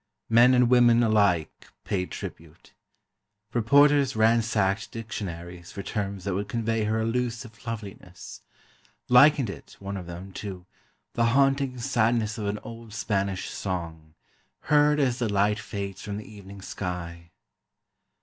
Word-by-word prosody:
Men 120 +3 +6
and 125 -1 +4
women 120 -1 +5
alike 100 -7 +1 0.2
paid 90 -2 -2
tribute. - - -9 0.8
Reporters 140 +3 +4
ransacked 110 -2 +2
dictionaries 90 -6 -7
for 100 - -7
terms 100 -3 -4
that 100 -1 -2
would 100 +2 -3
convey 115 -1 -1
her 110 +1 0
elusive 120 +1 -3
loveliness—likened 115 +6 0
it 90 - -12
(one 100 0 -5
of 90 -2 -8
them) 90 +3 -8
to 95 -2 -7 0.5
"the 115 - +1
haunting 135 -1 +2
sadness 115 -3 0
of 105 - -3
an 100 +1 -1
old 115 -1 -10
Spanish 100 -3 -2
song, 80 -4 -5 0.5
heard 150 0 +3
as 130 -3 +1
the 115 -4 -1
light 100 +1 +2
fades 100 -3 -6
from 105 -1 -5
the 105 - -8
evening 100 -2 -12
sky." 85 -3 -6
110 Hz, 130 wpm, -26 LUFS, 95-120 Hz, 0.8 s, Men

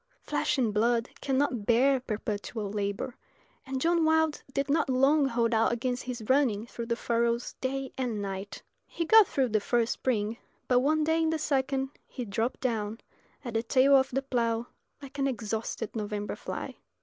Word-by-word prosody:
Flesh - - 0
and 235 -5 +1
blood 230 +2 +2
cannot 265 -5 0
bear 260 +3 +4
perpetual 215 -2 -4
labour, 205 +4 -3 0.5
and 265 0 -2
John 335 +3 +2
Wilde 320 -1 +2
did 275 +1 -1
not 295 0 +1
long 275 +3 +4
hold 235 -2 +1
out 225 +2 +3
against 245 +1 -1
his 250 -3 -5
running 260 -6 +2
through 235 -1 -7
the 235 - 0
furrows 235 0 0
day 270 0 -3
and 240 -5 -1
night. 195 0 -5 0.2
He 335 - -3
got 440 +2 +7
through 265 -3 0
the 215 0 +2
first 235 +2 +1
spring; 225 -3 -1 0.3
but 250 -1 +4
one 305 +4 +2
day 320 +1 +2
in 320 - +2
the 320 - 0
second 270 -2 0 0.2
he 250 - -6
dropped 225 +4 -2
down 225 -3 -2 0.5
at 240 - -4
the 225 - +1
tail 260 +4 +4
of 265 -1 +4
the 270 +2 -1
plough 235 -3 0 0.4
like 275 +1 -9
an 275 - +2
exhausted 225 -2 -3
November 210 -1 -3
fly. - - -6
245 Hz, 175 wpm, -29 LUFS, 225-275 Hz, 0.5 s, got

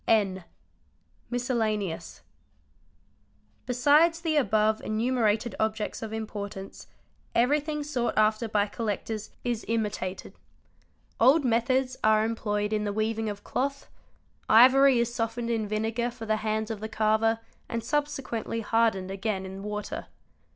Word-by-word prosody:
N. 195 -5 +2 0.8
Miscellaneous. 220 -7 -2 1.4
Besides 295 +7 +4
the 325 -2 0
above 220 -6 +2
enumerated 225 0 0
objects 220 0 -1
of 220 -1 -5
importance, 205 -3 -6 0.5
everything 295 +5 +1
sought 260 -5 -2
after 215 +2 +3
by 210 -1 +2
collectors 215 0 -4
is 240 -3 -2
imitated. 210 -4 -3 0.9
Old 270 +5 +5
methods 255 +2 +1
are 215 0 +4
employed 210 -2 -1
in 210 -1 0
the 205 - -1
weaving 220 +1 -1
of 205 0 -7
cloth; 275 +2 -3 0.6
ivory 260 +3 +7
is 235 0 0
softened 230 0 -2
in 220 -2 -1
vinegar 220 +3 -1
for 240 -2 -9
the 215 0 +1
hands 215 +1 -2
of 220 - -4
the 220 +1 -5
carver, 220 +1 +2 0.2
— - - -37
and 230 -1 -3
subsequently 275 -6 -2
hardened 220 -4 +1
again 195 -1 -2
in 190 +1 -7
water. 210 0 -5
225 Hz, 125 wpm, -27 LUFS, 215-245 Hz, 1.4 s, ivory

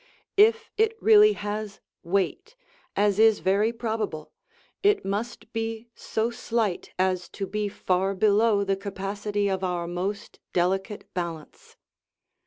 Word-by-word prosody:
If 450 +2 +4
it 445 +1 +2
really 425 -1 +7
has 210 - -5 0.2
weight, 200 - -1 0.4
as 205 0 +2
is 220 -1 +6
very 200 +4 +2
probable, 220 -9 -4 0.5
it 410 - +3
must 215 +3 -4
be 225 0 -4
so 225 +1 -2
slight 225 -5 -2
as 185 -2 0
to 195 - -2
be 210 +1 -2
far 190 0 0
below 210 +1 +3
the 195 0 +1
capacity 200 +1 -3
of 190 -1 -1
our 175 -2 -1
most 185 +4 -4
delicate 190 +4 0
balance. 170 -3 -6
205 Hz, 125 wpm, -26 LUFS, 190-225 Hz, 0.5 s, really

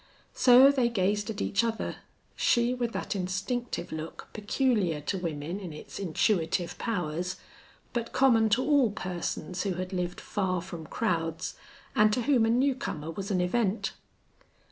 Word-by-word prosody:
So 255 +2 +7
they 255 -4 +2
gazed 205 0 0
at 215 -2 -4
each 205 - +1
other, 225 -1 -2 0.4
she 240 +1 +3
with 240 -2 -2
that - - -3
instinctive 200 +7 -3
look 160 +1 -7
peculiar 210 - +1
to 190 +6 -2
women 165 +1 -4
in 185 -5 -7
its 150 - -9
intuitive 175 -1 0
powers, 180 -4 -2 0.6
but 235 -1 -2
common 230 -5 +4
to 235 +5 +3
all 285 -6 +4
persons 180 -1 -4
who 195 -3 -1
had 185 +2 -4
lived 180 -1 -2
far 185 -3 -1
from 170 -3 -8
crowds 165 -7 -1 0.4
and 215 0 +5
to 245 - 0
whom 245 -3 +3
a - - +1
new 260 +4 +3
comer 165 - -5
was 195 +4 -5
an 185 -3 +1
event. 205 +3 0
200 Hz, 155 wpm, -29 LUFS, 180-235 Hz, 0.6 s, So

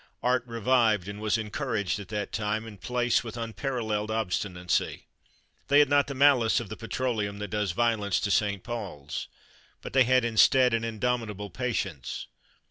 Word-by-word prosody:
Art 125 -1 +2
revived 115 -4 +2
and 100 +1 -7
was 110 +1 +1
encouraged 110 - -2
at 100 - -8
that 105 -1 -4
time 110 +1 -2
and 105 -4 -11
place 125 -1 +1
with 115 0 -7
unparalleled 115 -2 -2
obstinacy. 90 -4 -1 0.6
They 145 - +4
had 145 -2 +6
not 145 -1 +4
the 140 - -5
malice 130 -4 +4
of - - -7
the 110 - -5
petroleum 115 -3 -2
that 105 0 -5
does 105 -3 -1
violence 110 -2 +1
to 105 - -1
St 100 -1 +1
Paul's; 100 -12 -5 0.5
but - - -9
they 130 -1 +5
had 130 0 +3
instead 125 +2 +5
an 115 0 +1
indomitable 110 -3 -2
patience. 100 - -3
110 Hz, 160 wpm, -28 LUFS, 105-125 Hz, 0.6 s, had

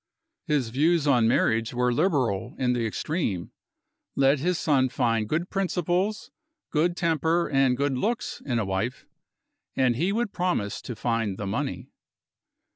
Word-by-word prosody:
His 145 -7 +1
views 155 +6 +2
on 125 -6 +4
marriage 115 0 +1
were 125 0 +2
liberal 125 - 0
in 125 -2 +1
the 120 -2 0
extreme. 110 - -2 0.6
Let 135 +1 +3
his 175 +4 0
son 135 -6 +2
find 115 -3 0
good 170 +4 -1
principles, 190 +1 -1 0.4
good 170 +3 +1
temper, 165 +1 +1
and 135 -3 +2
good 140 0 0
looks, 225 - -2
in 125 -4 -1
a 110 - 0
wife, 95 +6 -3 0.7
and 125 -2 +2
he 175 +10 0
would 225 0 -1
promise 175 - -1
to 120 - -6
find 115 -4 -1
the 100 - -4
money. 100 - -3
135 Hz, 145 wpm, -26 LUFS, 115-170 Hz, 0.7 s, on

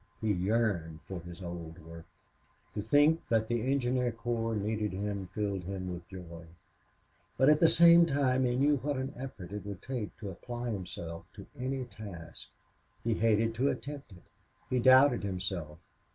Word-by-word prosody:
He 110 -2 +1
yearned 95 -5 0
for 95 -2 -5
his 85 +2 -10
old 85 -1 -7
work. 85 0 -11 0.7
To 105 - -2
think 145 +9 +4
that 110 -1 +2
the 120 +2 0
engineer 125 -2 +1
corps 115 0 -2
needed 105 0 -1
him 100 0 -3
filled 100 -1 -3
him 95 -1 -4
with 85 0 -9
joy. 85 -3 -9 0.9
But 130 - +5
at 150 0 +5
the 165 - +7
same 170 0 +7
time 135 -3 +2
he 120 0 +1
knew 145 +3 +3
what 145 +1 -2
an 130 +2 -3
effort 120 -8 -8
it 105 0 -5
would 100 -2 -7
take 125 -6 -4
to 100 -3 -6
apply 120 +5 -5
himself 85 -4 -6
to - - -10
any 130 +1 -2
task. 100 -7 -9 0.5
He 115 - +1
hated 115 0 +2
to 130 +5 +1
attempt 140 -4 -5
it. 90 - -15 0.5
He 130 - +2
doubted 130 +1 +6
himself. 90 -5 -4
110 Hz, 165 wpm, -31 LUFS, 95-130 Hz, 0.9 s, the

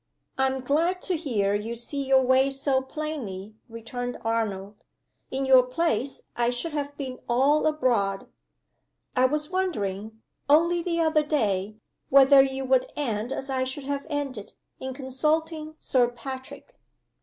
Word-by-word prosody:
"I'm 265 0 0
glad 330 +8 0
to 370 - -1
hear 225 -11 0
you 215 +3 -2
see 275 +4 -3
your 265 -1 +5
way 260 +1 +4
so 270 -1 +1
plainly," 265 -9 -5 0.2
returned 245 +2 -5
Arnold. 210 -3 -2 0.5
"In 270 +1 -2
your 260 -1 +7
place, 255 -1 -1
I 240 0 +1
should 245 +7 -3
have 285 -1 -4
been 260 -3 -5
all 275 +6 +3
abroad. 235 -10 0 0.9
I 255 0 +4
was 300 +4 -1
wondering, 220 - -2 0.3
only 340 +4 +4
the 335 0 -1
other 315 -1 +3
day, 215 -9 -1 0.3
whether 275 0 +8
you 270 0 -1
would 260 -1 +2
end, 235 -4 -2
as 270 0 -4
I 260 -1 0
should 260 +2 -5
have 280 +2 -4
ended, 275 -8 -4 0.3
in 260 -1 -5
consulting 310 +4 -1
Sir 250 -5 +2
Patrick." 260 - -9
265 Hz, 145 wpm, -26 LUFS, 235-295 Hz, 0.9 s, whether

